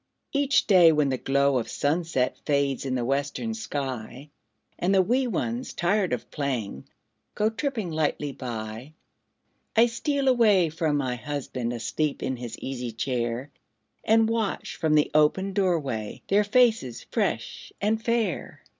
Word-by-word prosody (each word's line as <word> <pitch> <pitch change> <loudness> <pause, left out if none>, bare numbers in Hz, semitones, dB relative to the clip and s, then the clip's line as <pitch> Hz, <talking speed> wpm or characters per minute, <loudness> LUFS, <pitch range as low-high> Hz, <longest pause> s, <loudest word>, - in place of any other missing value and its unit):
Each 280 0 +3
day, 180 -5 +7
when 150 -2 +2
the 130 - 0
glow 140 -1 +2
of 115 - -5
sunset 145 -3 0
Fades 140 -2 0
in 130 - -1
the 120 -2 -1
western 140 - -1
sky, 140 - -5 0.5
And 190 +3 +2
the 190 - +6
wee 250 +6 +1
ones, 235 +2 -3
tired 190 +2 +1
of 125 - -3
playing, 125 - -3 0.5
Go 215 +1 +1
tripping 225 - -3
lightly 150 -2 -1
by, 120 +1 -6 0.8
I 230 +1 +7
steal 270 +4 -1
away 215 -9 +4
from 155 -1 0
my 130 -3 -1
husband, 130 -3 -4
Asleep 120 +6 -2
in 130 -1 -2
his 120 -2 -7
easy 125 -3 -5
chair, 120 +2 -2 0.5
And 225 0 +4
watch 225 -2 -2
from 155 -1 +1
the 150 - +3
open 170 +6 +3
door 185 -4 +2
way 110 -7 -5
Their 205 +2 +4
faces 220 - +2
fresh - - -2
and 220 +2 0
fair. 230 -7 -1
150 Hz, 145 wpm, -26 LUFS, 130-210 Hz, 0.8 s, day